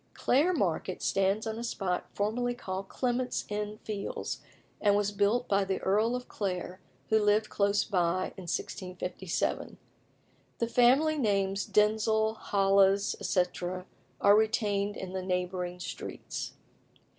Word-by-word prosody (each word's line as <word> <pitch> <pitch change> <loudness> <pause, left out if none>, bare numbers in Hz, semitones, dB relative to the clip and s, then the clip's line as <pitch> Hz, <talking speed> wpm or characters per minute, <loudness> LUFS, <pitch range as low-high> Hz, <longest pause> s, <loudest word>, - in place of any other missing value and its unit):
Clare 295 +8 +3
Market 185 - -1
stands 195 +2 +1
on 220 0 -3
a - - -4
spot 190 -6 -2
formerly 245 +4 0
called 190 -4 -5
Clement's 250 0 -1
Inn 210 0 -3
Fields, 205 -2 -4 0.4
and 205 -1 +4
was 205 0 +1
built 205 +4 +1
by 200 0 +3
the 190 -1 -1
Earl 215 +5 +2
of 250 0 -5
Clare, 185 -2 -3 0.3
who 220 - +4
lived 210 +1 +2
close 200 0 +2
by, 185 -2 0
in 180 -3 -8
1657. 180 0 -3 0.8
The 235 - 0
family 265 +6 +4
names, 195 -4 +1
Denzil, 220 +1 +3
Holles, 195 -1 +3
etc., 180 0 -1 0.3
are 200 0 +6
retained 210 -2 +1
in 185 -1 -6
the 190 - -2
neighbouring 180 -1 -2
streets. - - -6
200 Hz, 130 wpm, -30 LUFS, 190-220 Hz, 0.8 s, are